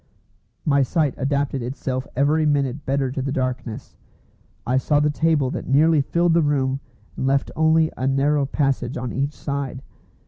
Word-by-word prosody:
My 140 -2 +3
sight 145 +1 +1
adapted 140 0 -1
itself 130 +1 -4
every 145 +4 +2
minute 145 -2 0
better 135 -1 0
to 135 - -3
the 135 +1 -2
darkness. 130 -4 -4 0.7
I 130 +2 +1
saw 145 +2 +2
the 150 0 +2
table 150 -4 +1
that - - -5
nearly 150 +3 +4
filled 170 +4 +1
the 170 - +4
room, 135 -3 0 0.4
and 130 - -2
left 135 0 +1
only 160 0 +3
a 130 - -2
narrow 140 +1 +2
passage 135 -3 -1
on 125 -1 -4
each 140 +3 -1
side. 140 -2 -4
140 Hz, 165 wpm, -22 LUFS, 130-150 Hz, 0.7 s, nearly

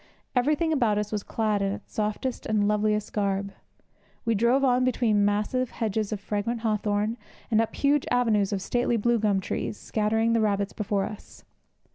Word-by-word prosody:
Everything 300 +6 +2
about 235 -8 +2
us 210 0 -2
was 210 -1 -1
clad 215 -1 -1
in 195 0 0
its - - -10
softest 215 +3 -2
and 210 -2 +2
loveliest 210 0 0
garb. 200 -1 -1 0.7
We 230 - +2
drove 235 +6 +3
on 255 -1 +3
between 230 -5 +2
massive 210 +5 0
hedges 215 -1 -2
of 210 - -2
fragrant 210 +3 -2
hawthorn, 215 0 0 0.3
and 220 0 +4
up 225 - -3
huge 285 0 +2
avenues 220 -5 +2
of 195 -2 -2
stately 240 +1 +1
blue 235 +2 +2
gum 205 -2 +2
trees, 195 +2 -3
scattering 220 +1 0
the 230 - +3
rabbits 200 -2 0
before 205 -2 -1
us. 210 - -10
215 Hz, 170 wpm, -26 LUFS, 205-235 Hz, 0.7 s, and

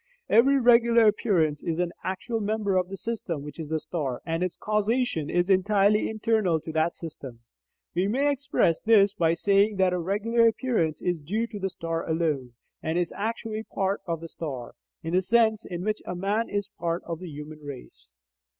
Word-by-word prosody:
Every 270 +5 +5
regular 235 -1 +5
appearance 180 -8 +2
is 165 -1 -2
an 175 -1 0
actual 205 +5 -3
member 210 -2 -1
of 180 0 +1
the 195 - -6
system 190 -10 -4
which 150 +2 -9
is 155 -2 -5
the 160 0 0
star, 140 -7 -3
and 165 0 -2
its 185 -1 -1
causation 210 - 0
is 175 0 +1
entirely 200 +2 +3
internal 215 -6 +1
to 160 - -6
that 160 +2 +1
system. 135 -7 -9 0.5
We 180 +3 +1
may 275 +7 +2
express 275 - +1
this 205 -3 +5
by 165 -3 +2
saying 200 +3 +3
that 190 -1 +2
a 180 - 0
regular 220 +6 +2
appearance 225 - 0
is 175 -2 0
due 210 +10 -1
to 220 -3 -8
the 195 0 -1
star 165 -2 -3
alone, 155 -7 -1 0.3
and 160 +2 -1
is 175 -2 0
actually 220 0 -3
part 195 -2 -2
of 165 -1 -2
the 165 - -6
star, 135 -8 -6 0.3
in 165 +1 -4
the 185 - +4
sense 220 +2 +2
in 175 -1 -5
which 215 0 -1
a 180 - -5
man 205 +5 -1
is 205 -1 -2
part 170 0 -1
of 165 -1 -5
the 180 -1 -7
human 150 +1 -9
race. 125 - -10
185 Hz, 190 wpm, -26 LUFS, 165-215 Hz, 0.5 s, Every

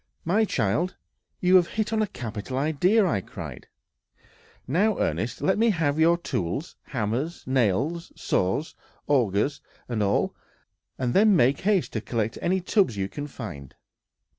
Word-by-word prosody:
"My 205 +7 +3
child, 155 - 0 0.5
you 185 +1 +6
have 175 -2 +3
hit 215 0 0
on 220 - +2
a 215 - +1
capital 115 - -5
idea," 160 +10 +3 0.2
cried - - -9 0.5
I. - - -31 0.4
"Now, 195 - +2
Ernest, 115 - -2
let 190 +2 +2
me 230 +1 +4
have 160 -6 +1
your 170 +2 +5
tools, 140 - -3
hammers, 130 +8 -2
nails, 130 - 0
saws, 95 - -1 0.3
augers, 125 -1 +1 0.3
and 115 -3 -2
all; 100 -1 +1 0.6
and 125 -2 -1
then 205 +1 +5
make 135 -3 +3
haste 195 -2 +1
to 110 - -2
collect 115 -1 -2
any 185 +2 +1
tubs 185 - +2
you 95 -1 -1
can 145 +5 -6
find!" 75 - -8
145 Hz, 145 wpm, -26 LUFS, 115-185 Hz, 0.6 s, you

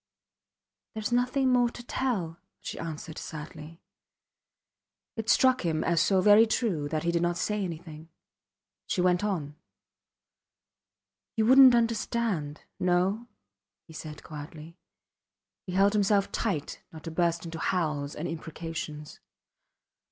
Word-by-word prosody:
There 220 - -4
is 210 - -2
nothing 255 +2 +2
more 245 -1 +4
to 240 - -10
tell, 200 -11 -2 0.2
she - - -7
answered, 160 -1 -6
sadly. 155 +1 -9 1.3
It 225 -1 -4
struck 255 -2 +4
him 160 -2 0
as 170 -1 +2
so 190 -2 +3
very 210 +3 +7
true 180 -11 -1
that 155 0 -2
he 170 - +1
did 170 0 0
not 175 0 0
say 210 +1 -1
anything. 160 -2 -7 0.8
She - - -1
went 180 +1 +2
on: 155 -8 -2 1.8
You 220 - +2
wouldnt 260 +1 +8
understand.... 225 -9 -1 0.2
No? 185 +6 +1 0.6
he 160 - -15
said, 155 -1 -8
quietly. 155 +2 -9 0.9
He 180 - -5
held 200 +2 +4
himself 205 -1 +2
tight 185 -10 -2
not 160 -1 -11
to 165 - -6
burst 170 0 0
into 165 -1 -6
howls 150 -6 -1
and 160 - -4
imprecations. 160 -2 -6
175 Hz, 130 wpm, -28 LUFS, 160-215 Hz, 1.8 s, wouldnt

